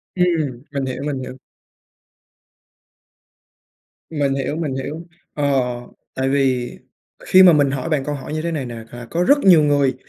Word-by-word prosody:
Ừm, 160 Hz, -9 st, 0 dB
mình 140 Hz, -2 st, -3 dB
hiểu, 130 Hz, +1 st, -5 dB
mình 140 Hz, -3 st, -2 dB
hiểu. 130 Hz, 0 st, -7 dB, 2.7 s
Mình 140 Hz, -3 st, 0 dB
hiểu, 140 Hz, +2 st, -2 dB
mình 150 Hz, -5 st, -3 dB
hiểu. 150 Hz, +6 st, -6 dB, 0.3 s
Ờ, 145 Hz, -1 st, 0 dB, 0.6 s
tại 130 Hz, 0 st, -1 dB
vì 130 Hz, -3 st, +1 dB, 0.5 s
khi 185 Hz, -, +6 dB
mà 180 Hz, -2 st, +8 dB
mình 145 Hz, -3 st, +3 dB
hỏi 135 Hz, 0 st, -3 dB
bạn 150 Hz, -4 st, 0 dB
câu 150 Hz, -, -3 dB
hỏi 140 Hz, +1 st, -7 dB
như 155 Hz, -, -3 dB
thế 170 Hz, 0 st, -2 dB
này 145 Hz, -5 st, -3 dB
nè, 120 Hz, -, -7 dB, 0.2 s
là 120 Hz, -1 st, -9 dB
có 170 Hz, +1 st, 0 dB
rất 285 Hz, +7 st, +5 dB
nhiều 180 Hz, -, +6 dB
người 140 Hz, -3 st, +2 dB
140 Hz, 165 wpm, -20 LUFS, 130-160 Hz, 2.7 s, mà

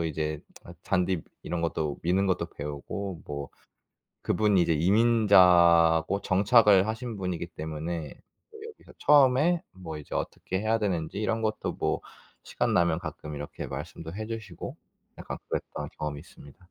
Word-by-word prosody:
아, 85 Hz, -, 0 dB
이제 75 Hz, -1 st, -3 dB, 0.4 s
잔디 90 Hz, -3 st, 0 dB, 0.2 s
이런 85 Hz, 0 st, -3 dB
것도 80 Hz, -3 st, -2 dB
미는 95 Hz, +3 st, +2 dB
것도 90 Hz, -2 st, 0 dB
배우고, 75 Hz, +5 st, -6 dB
뭐 70 Hz, -1 st, -5 dB, 0.7 s
그분이 100 Hz, -1 st, +2 dB
이제 85 Hz, -1 st, +2 dB
이민자고 90 Hz, -3 st, +5 dB
정착을 100 Hz, 0 st, +5 dB
하신 110 Hz, 0 st, -4 dB
분이기 90 Hz, -3 st, -3 dB
때문에 80 Hz, 0 st, -5 dB, 0.4 s
저도 440 Hz, -, -13 dB
여기서 435 Hz, -, -16 dB
처음에 145 Hz, +4 st, +5 dB
뭐 85 Hz, -4 st, -8 dB
이제 75 Hz, -, -8 dB
어떻게 95 Hz, 0 st, -3 dB
해야 110 Hz, +2 st, +1 dB
되는지 90 Hz, -4 st, -2 dB
이런 110 Hz, +1 st, -1 dB
것도 110 Hz, -1 st, -2 dB
뭐 -, -, -1 dB, 0.4 s
시간 -, -, -1 dB
나면 85 Hz, -2 st, +2 dB
가끔 75 Hz, -3 st, -7 dB
이렇게 75 Hz, +1 st, -6 dB
말씀도 80 Hz, +3 st, -7 dB
해 110 Hz, -, -4 dB
주시고 110 Hz, -6 st, -7 dB, 0.4 s
약간 -, -, -6 dB
그랬던 -, -, -4 dB
경험이 75 Hz, -1 st, -4 dB
있습니다. 70 Hz, -2 st, -15 dB
90 Hz, 320 characters per minute, -28 LUFS, 80-105 Hz, 0.7 s, 이민자고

